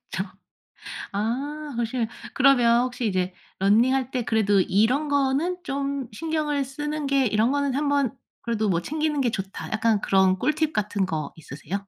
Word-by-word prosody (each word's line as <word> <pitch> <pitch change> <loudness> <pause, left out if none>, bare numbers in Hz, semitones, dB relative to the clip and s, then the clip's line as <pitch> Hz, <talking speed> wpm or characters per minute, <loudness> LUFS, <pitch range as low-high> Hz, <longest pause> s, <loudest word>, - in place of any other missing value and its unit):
저 - - -2 0.9
아 275 +8 -3
혹시 235 0 -1 0.3
그러면 245 -3 +5
혹시 245 -2 -3
이제 185 -2 -1 0.2
러닝할 245 +6 +3
때 255 -2 -1
그래도 205 -3 +3
이런 250 +12 +2
거는 285 +6 +1
좀 275 -4 -3
신경을 300 +1 -1
쓰는 295 +2 -4
게 275 -1 +2
이런 220 +4 +2
거는 285 -2 0
한번 285 -3 +1 0.3
그래도 220 -3 -1
뭐 170 -2 +1
챙기는 305 - -1
게 245 -3 +2
좋다. 195 -2 -5
약간 220 -1 +2
그런 190 -1 +3
꿀팁 305 +6 0
같은 205 -2 0
거 155 -5 -3
있으세요? 150 +3 -8
250 Hz, 295 characters per minute, -25 LUFS, 210-285 Hz, 0.9 s, 그러면